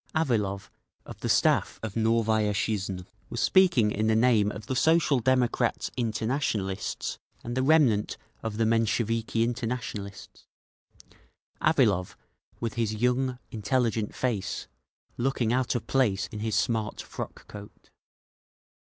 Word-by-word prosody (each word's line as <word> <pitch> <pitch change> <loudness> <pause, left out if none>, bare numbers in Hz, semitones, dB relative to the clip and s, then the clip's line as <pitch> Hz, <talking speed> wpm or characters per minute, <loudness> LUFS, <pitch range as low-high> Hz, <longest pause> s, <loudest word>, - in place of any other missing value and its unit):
Avilov 105 -11 0 0.3
of - - -10
the - - -3
staff - - +2
of 110 -2 -5
Novaya 110 -2 +2
Zhizn 95 -2 -2 0.2
was - - -4
speaking 175 - +4
in 110 +1 0
the 110 - +3
name 110 -3 +3
of 105 -1 -8
the 130 - -3
Social 160 -1 +3
Democrat 125 -1 +1
Internationalists 110 -4 -2 0.2
and 120 +1 -4
the 130 - +1
remnant 130 -8 +3 0.2
of 110 -2 -4
the 115 - +2
Mensheviki 115 0 +1
Internationalists; 115 -4 -5 1.1
Avilov, 90 +1 +2 0.4
with 115 -2 -3
his 110 -2 -1
young, 125 +3 +1
intelligent 110 0 -1
face, 110 -7 -2 0.5
looking 120 -2 0
out 130 0 0
of 120 - -2
place 110 -8 +1
in 105 - -6
his 110 0 -1
smart 110 -2 0
frock - - -8
coat. 105 0 -12
115 Hz, 125 wpm, -27 LUFS, 105-125 Hz, 1.1 s, speaking